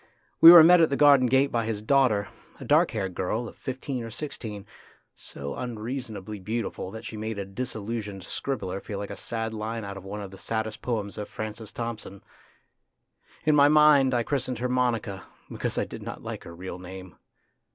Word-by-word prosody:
We 165 - +13
were 170 -2 +11
met 175 +1 +7
at 160 - +4
the 140 - 0
garden 140 -3 +6
gate 135 +3 +3
by 115 -1 0
his 105 -2 -3
daughter, 110 -6 +2 0.3
a - - -8
dark - - +4
haired 95 -4 -3
girl 110 +7 -2
of - - -11
fifteen 130 0 -5
or 115 - -6
sixteen, 110 -6 -6 0.5
so 70 0 -7
unreasonably 110 -3 -5
beautiful 110 -1 -4
that 110 +3 -9
she 110 - -7
made 110 0 -4
a 100 - -3
dis 125 +6 -5
illusioned 105 -3 -5
scribbler 100 -2 -4
feel 100 - -6
like 100 0 -5
a - - -5
sad 115 +2 -4
line 110 0 -4
out 100 0 -6
of 95 - -10
one 100 +2 -6
of 100 -2 -7
the 95 - -12
saddest 110 0 -3
poems 105 -5 -3
of 105 - -5
Francis 110 0 -6
Thompson. 115 -4 -6 1.2
In 155 -1 +4
my 145 -1 +7
mind 145 -3 +5
I 120 - +1
christened 130 -1 -2
her 125 +3 -1
Monica, 120 -6 -1 0.2
because - - -3
I - - +1
did - - -9
not - - -7
like - - -6
her 85 - -10
real 90 0 -7
name. 95 -1 -10
110 Hz, 195 wpm, -26 LUFS, 100-125 Hz, 1.2 s, We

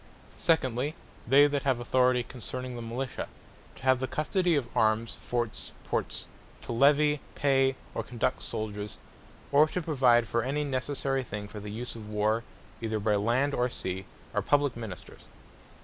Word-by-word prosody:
Secondly, 140 -2 +1 0.3
they 140 +4 +7
that 145 -1 +1
have 130 -3 +1
Authority 125 0 +3
concerning 125 +1 -6
the 120 - -5
Militia; 125 +3 -4 0.5
to - - -15
have 130 -1 +4
the 130 - -1
custody 175 +4 +1
of 135 -5 0
Armes, 110 +1 +2
Forts, 120 -2 -3
Ports; - - -2 0.4
to - - -5
Levy, 145 +4 +4 0.2
Pay, 135 -2 +3 0.2
or - - -1
Conduct 125 +1 -1
Souldiers; 105 -2 -4 0.5
or 145 +2 +6
to 180 - -2
provide 130 -8 +4
for 115 - +1
any 140 +5 -1
necessary 135 0 -1
thing 105 -4 -6
for 105 - -8
the 105 0 -7
use 115 +4 -5
of 110 -2 -8
war, 105 +2 +1 0.4
either 110 -1 -1
by 105 0 +2
Land 120 +7 +2
or 125 -1 +1
Sea, 95 -4 -4 0.3
are - - +1
publique 145 -3 +2
Ministers. 110 -6 -8
125 Hz, 160 wpm, -29 LUFS, 115-140 Hz, 0.5 s, they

